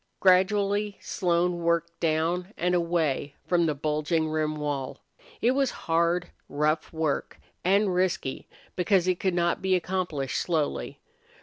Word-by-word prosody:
Gradually 200 Hz, +2 st, +3 dB
Slone 175 Hz, -1 st, 0 dB
worked 170 Hz, 0 st, 0 dB
down 170 Hz, +4 st, 0 dB
and 180 Hz, +1 st, +1 dB
away 165 Hz, -5 st, 0 dB
from 170 Hz, -2 st, +2 dB
the 150 Hz, -, 0 dB
bulging 155 Hz, +2 st, 0 dB
rim 155 Hz, 0 st, -1 dB
wall. 145 Hz, -3 st, -4 dB, 0.4 s
It 240 Hz, -, +4 dB
was 270 Hz, 0 st, +2 dB, 0.2 s
hard, 170 Hz, +2 st, +1 dB, 0.2 s
rough 150 Hz, +2 st, 0 dB
work, 160 Hz, -3 st, -2 dB, 0.2 s
and 195 Hz, +1 st, +3 dB
risky 180 Hz, -7 st, -1 dB, 0.3 s
because 185 Hz, 0 st, +2 dB
it 180 Hz, -1 st, +1 dB
could 190 Hz, -2 st, 0 dB
not 170 Hz, -1 st, +1 dB
be 190 Hz, 0 st, +2 dB
accomplished 175 Hz, -7 st, -2 dB
slowly. 160 Hz, -4 st, -2 dB
170 Hz, 130 wpm, -27 LUFS, 155-185 Hz, 0.4 s, It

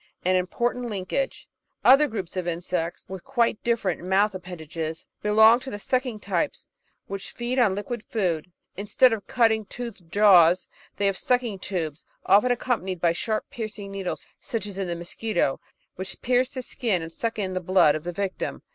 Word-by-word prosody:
An 185 Hz, +1 st, +3 dB
Important 240 Hz, +7 st, 0 dB
Linkage 205 Hz, +7 st, -3 dB, 0.4 s
Other 280 Hz, +3 st, +7 dB
groups 195 Hz, -9 st, -5 dB
of 180 Hz, -2 st, -2 dB
Insects, 170 Hz, 0 st, -3 dB
with 190 Hz, -2 st, -7 dB
quite 240 Hz, -5 st, +1 dB
diflFerent 225 Hz, -7 st, 0 dB
mouth 190 Hz, +3 st, +2 dB
ap 185 Hz, -, -6 dB
pendages, 160 Hz, -2 st, -6 dB, 0.2 s
belong 220 Hz, +3 st, +6 dB
to 265 Hz, -, -7 dB
the 205 Hz, -, -5 dB
sucking 250 Hz, +1 st, -1 dB
types, 205 Hz, +10 st, -2 dB, 0.4 s
which 195 Hz, 0 st, -6 dB
feed 245 Hz, +2 st, -2 dB
on 210 Hz, -6 st, +4 dB
liquid 210 Hz, +3 st, -4 dB
food. 180 Hz, -6 st, -1 dB, 0.2 s
Instead 210 Hz, +5 st, +3 dB
of 215 Hz, -3 st, -5 dB
cutting, 225 Hz, -2 st, +3 dB
toothed 220 Hz, -6 st, -8 dB
jaws, 185 Hz, -4 st, +6 dB, 0.3 s
they 205 Hz, -, 0 dB
have 195 Hz, -1 st, +1 dB
sucking 245 Hz, -6 st, 0 dB
tubes, 165 Hz, -6 st, -3 dB, 0.2 s
often 210 Hz, +6 st, +5 dB
accompanied 230 Hz, -7 st, -1 dB
by 170 Hz, 0 st, +3 dB
sharp 215 Hz, +5 st, -2 dB
piercing 215 Hz, -3 st, -6 dB
needles 195 Hz, -2 st, -4 dB, 0.2 s
as 210 Hz, -4 st, -4 dB
in 195 Hz, -, -1 dB
the 170 Hz, -, -2 dB
Mosquito, 175 Hz, -3 st, -1 dB, 0.4 s
which 190 Hz, +1 st, -5 dB
pierce 250 Hz, +1 st, +2 dB
the 260 Hz, -2 st, -6 dB
skin 210 Hz, -9 st, -1 dB
and 165 Hz, 0 st, -8 dB
suck 230 Hz, +3 st, -3 dB
in 190 Hz, -3 st, -2 dB
the 185 Hz, -, -2 dB
blood 185 Hz, -4 st, +5 dB
of 155 Hz, -, -4 dB
the 175 Hz, -, -3 dB
victim. 190 Hz, +1 st, -4 dB
200 Hz, 175 wpm, -25 LUFS, 180-235 Hz, 0.4 s, Other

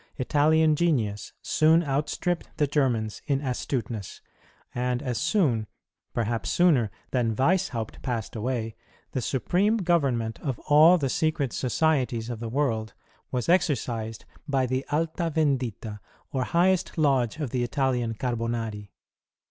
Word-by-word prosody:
Italian 155 Hz, +3 st, +3 dB
genius 125 Hz, -12 st, 0 dB
soon 160 Hz, +2 st, +4 dB
outstripped 150 Hz, +4 st, -1 dB
the 150 Hz, -, +3 dB
Germans 125 Hz, -7 st, 0 dB
in 140 Hz, -3 st, +1 dB
astuteness; 120 Hz, -5 st, -3 dB, 0.5 s
and 125 Hz, 0 st, -1 dB
as 125 Hz, -4 st, -2 dB
soon, 150 Hz, -, +1 dB, 0.4 s
perhaps 115 Hz, 0 st, -1 dB
sooner, 150 Hz, -, +3 dB, 0.2 s
than 115 Hz, -4 st, +1 dB
Weishaupt 130 Hz, -, 0 dB
passed 120 Hz, -6 st, -3 dB
away, 115 Hz, -1 st, -2 dB, 0.4 s
the 130 Hz, -, -2 dB
supreme 185 Hz, -, +1 dB
government 140 Hz, -, 0 dB
of 135 Hz, -6 st, -2 dB
all 155 Hz, +5 st, +6 dB
the 140 Hz, -5 st, -1 dB
secret 155 Hz, -3 st, 0 dB
societies 125 Hz, -4 st, 0 dB
of 115 Hz, -, -5 dB
the 115 Hz, 0 st, -4 dB
world 115 Hz, -4 st, -1 dB, 0.4 s
was 125 Hz, -2 st, -2 dB
exercised 120 Hz, -10 st, 0 dB, 0.2 s
by 135 Hz, -3 st, +1 dB
the 130 Hz, +1 st, -1 dB
Alta 165 Hz, +2 st, 0 dB
Yendita 125 Hz, -8 st, -1 dB, 0.3 s
or 130 Hz, -3 st, -1 dB
highest 180 Hz, +3 st, +1 dB
lodge 135 Hz, -5 st, +2 dB
of 145 Hz, -7 st, -3 dB
the 125 Hz, -, 0 dB
Italian 125 Hz, -3 st, 0 dB
Carbonari. 115 Hz, -3 st, -3 dB
130 Hz, 125 wpm, -26 LUFS, 115-155 Hz, 0.5 s, all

